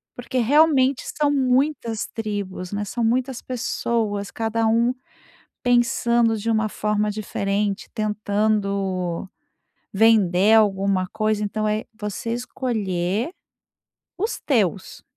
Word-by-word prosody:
Porque 245 +1 -5
realmente 275 +1 +4 0.2
são 295 -1 +3
muitas 260 -4 +1
tribos, 200 -4 -5
né. 205 0 -2
São 235 +4 -3
muitas 250 +2 0
pessoas, 225 -4 -2
cada 225 0 -1
um 230 +3 +3 0.7
pensando 235 -2 +2
de 225 +2 -3
uma 220 -1 +1
forma 210 0 -1
diferente, 205 0 -2
tentando 200 -4 -1 0.6
vender 205 -2 +4
alguma 195 -3 +3
coisa. 215 +1 -1
Então, 215 +1 -1
é 215 +1 -1
você 210 +2 -4
escolher, 220 - -2 0.9
os 430 +5 -2
teus. 205 - -1
215 Hz, 105 wpm, -23 LUFS, 200-240 Hz, 0.9 s, realmente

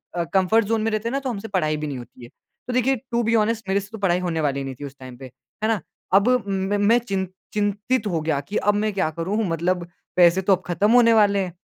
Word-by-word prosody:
अ, 170 - 0
comfort 205 +4 +3
zone 225 +1 0
में 225 - 0
रहते 215 +2 -1
हैं - - -5
ना 275 - 0
तो 270 -2 -4
हमसे 225 -1 -5
पढ़ाई 155 -6 0
भी 150 0 -4
नहीं 140 -3 -4
होती 120 0 -13
है। 120 - -11 0.4
तो 250 - -3
देखिए 255 +2 +2 0.2
टू 235 0 +1
बी 230 +1 +2
ऑनेस्ट 220 -1 0
मेरे 195 +1 +2
से 200 - -12
तो 220 - -7
पढ़ाई 180 -3 +2
होने 170 -3 -2
वाली 140 -2 -1
नहीं 135 -1 -6
थी - - -4
उस 140 0 -9
टाइम 130 -1 -10
पे, 135 - -10
है 130 - -7
ना? 220 -6 0 0.3
अब 200 +5 +5 0.2
मैं 195 +1 -1
मैं 210 +4 +4
चिन 195 -5 -3 0.3
चिंतित 210 +3 0
हो 165 -4 -1
गया 155 -3 0
कि 205 +9 -4
अब 205 - +2
मैं 215 +1 0
क्या 185 -5 0
करूँ? 170 +6 -3
मतलब 170 +1 -1 0.3
पैसे 180 +1 +5
तो 195 +1 +3
अब 185 - -13
खत्म 190 +5 +1
होने 235 -2 +6
वाले 205 -2 +4
हैं। 180 -3 -3
195 Hz, 265 wpm, -23 LUFS, 165-220 Hz, 0.4 s, होने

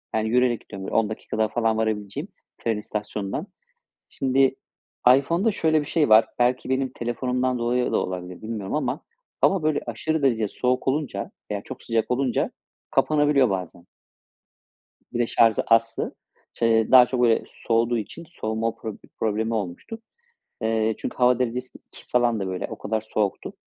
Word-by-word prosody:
Yani, 110 0 0
yürüyerek 125 -1 +2
gidiyorum. 95 -1 -9
Böyle - - -4
10 110 -2 +3
dakikada 110 0 -2
falan 110 0 0
varabileceğim 110 - -2 0.3
tren 115 -2 -1
istasyonundan 105 - -4 0.6
Şimdi, 135 0 +2 0.6
iPhone'da 170 +10 +1
şöyle 160 -4 +2
bir 145 - -6
şey 155 -2 +2
var. 110 +1 +7
Belki 125 +1 +1
benim 130 0 +1
telefonumdan 125 +1 -1
dolayı 120 +1 0
da - - +3
olabilir, 90 -1 -5
bilmiyorum 110 -3 -4
ama 150 - -1 0.4
hava 190 -3 +3
böyle 155 -1 +1
aşırı 155 +7 -2
derecede 115 -6 +2
soğuk 125 +5 -1
olunca 145 0 -1 0.2
veya 100 -1 -2
çok 130 - -9
sıcak 115 -1 -1
olunca 125 0 +1 0.4
kapanabiliyor 140 -2 +3
bazen. 90 -2 -4 1.3
Bir 120 - -2
de 120 - +2
şarjı 115 -2 +3
azsa. 115 0 +2 0.4
Ç - - -21
eee, 115 -1 +3
daha 125 -1 +9
çok, 125 0 -2
böyle, 115 -2 +4
soğuduğu 115 +1 0
için 115 - -7
soğuma 110 -6 -2
prob 110 -3 -6 0.2
problemi 110 +1 0
olmuştu. 110 - -4 0.6
Eee, 110 0 +1
çünkü - - -5
hava 125 -1 +4
derecesi 125 0 -3
2 - - -13
falandı, 120 -5 +1
böyle. 95 -1 -3
O - - -7
kadar 110 +1 -1
soğuktu, 105 -2 -2
115 Hz, 155 wpm, -24 LUFS, 110-130 Hz, 1.3 s, daha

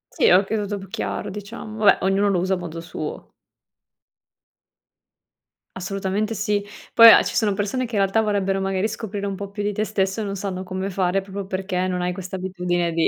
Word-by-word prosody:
Sì, - - +4
oka 195 +4 +4
tutto 205 -1 -2
più 195 -1 -10
chiaro 205 0 -4
diciamo. 210 +2 -8
Vabbè, 205 -2 +6
ognuno 195 +1 +2
lo 195 - +2
usa 190 +2 0
a - - +1
modo 170 -2 -6
suo. 170 - -7 2.4
Assolutamente 195 +3 -2
sì. 205 -1 0 0.3
Poi 230 -1 +10
a - - +8
ci - - -4
sono 210 -3 +2
persone 215 +6 -1
che 225 - -6
in 200 - +3
realtà 195 +3 +2
vorrebbero 195 -2 0
magari 195 +2 0
scoprire 205 -2 -5
un 195 -1 -2
po' 200 0 -6
più 205 0 -5
di 205 0 -1
te 210 - -1
stesso 195 0 -1
e - - -2
non 200 -1 -3
sanno 190 -1 -4
come 190 +1 -4
fare 185 +1 +1
proprio 195 0 -7
perché 185 -1 -2
non 180 -1 -2
hai 180 0 -1
questa 185 0 -6
abitudine 180 -2 -1
di 165 0 +2
195 Hz, 200 wpm, -23 LUFS, 185-205 Hz, 2.4 s, Poi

